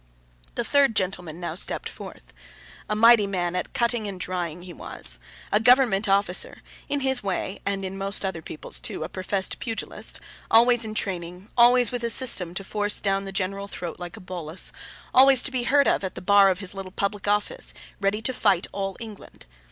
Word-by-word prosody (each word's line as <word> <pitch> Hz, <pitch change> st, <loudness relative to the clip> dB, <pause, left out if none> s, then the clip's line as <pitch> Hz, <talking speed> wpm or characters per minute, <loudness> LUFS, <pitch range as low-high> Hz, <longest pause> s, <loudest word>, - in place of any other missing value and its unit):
The -, -, -1 dB
third 275 Hz, -5 st, +3 dB
gentleman 180 Hz, -4 st, -2 dB
now 170 Hz, -3 st, -4 dB
stepped 175 Hz, -, 0 dB
forth. -, -, -11 dB, 0.6 s
A 210 Hz, -, 0 dB
mighty 225 Hz, -1 st, +6 dB
man 180 Hz, -2 st, -2 dB
at 180 Hz, -, -3 dB
cutting 235 Hz, -2 st, 0 dB
and 195 Hz, -2 st, -6 dB
drying, 175 Hz, -2 st, -4 dB
he 180 Hz, -1 st, -10 dB
was; -, -, +4 dB, 0.3 s
a 210 Hz, -, +3 dB
government 225 Hz, -4 st, +4 dB
officer; 195 Hz, -2 st, +1 dB, 0.3 s
in 285 Hz, -1 st, -1 dB
his 265 Hz, -1 st, +1 dB
way 195 Hz, 0 st, -3 dB
(and 195 Hz, -1 st, -1 dB
in 190 Hz, +1 st, -6 dB
most 195 Hz, +1 st, 0 dB
other 180 Hz, -4 st, -4 dB
people's 155 Hz, -, -4 dB
too), -, -, -4 dB
a 160 Hz, -, -6 dB
professed 190 Hz, +1 st, -3 dB
pugilist; 225 Hz, -2 st, -2 dB, 0.3 s
always 235 Hz, +1 st, +5 dB
in 215 Hz, 0 st, -6 dB
training, 180 Hz, 0 st, -4 dB
always 245 Hz, -1 st, +5 dB
with 245 Hz, -1 st, -4 dB
a 235 Hz, -, 0 dB
system 190 Hz, -9 st, +2 dB
to 195 Hz, -, -3 dB
force 205 Hz, +1 st, 0 dB
down 195 Hz, -1 st, 0 dB
the 195 Hz, -, -6 dB
general 195 Hz, +1 st, -3 dB
throat 175 Hz, -4 st, -7 dB
like 175 Hz, -1 st, -8 dB
a -, -, -11 dB
bolus, 180 Hz, -2 st, -2 dB, 0.4 s
always 265 Hz, -1 st, +6 dB
to 265 Hz, -, -2 dB
be 250 Hz, -2 st, -2 dB
heard 280 Hz, +2 st, +3 dB
of -, -, +1 dB
at 190 Hz, -, -4 dB
the -, -, -6 dB
bar 200 Hz, 0 st, +6 dB
of 185 Hz, -, 0 dB
his 195 Hz, -1 st, -3 dB
little 195 Hz, -1 st, -8 dB
Public 200 Hz, +1 st, -3 dB
office, 210 Hz, -, 0 dB, 0.3 s
ready 205 Hz, +2 st, -1 dB
to 260 Hz, -, 0 dB
fight 200 Hz, -7 st, +2 dB
all 195 Hz, -1 st, -4 dB
England. 215 Hz, -, -11 dB
200 Hz, 195 wpm, -24 LUFS, 185-230 Hz, 0.6 s, mighty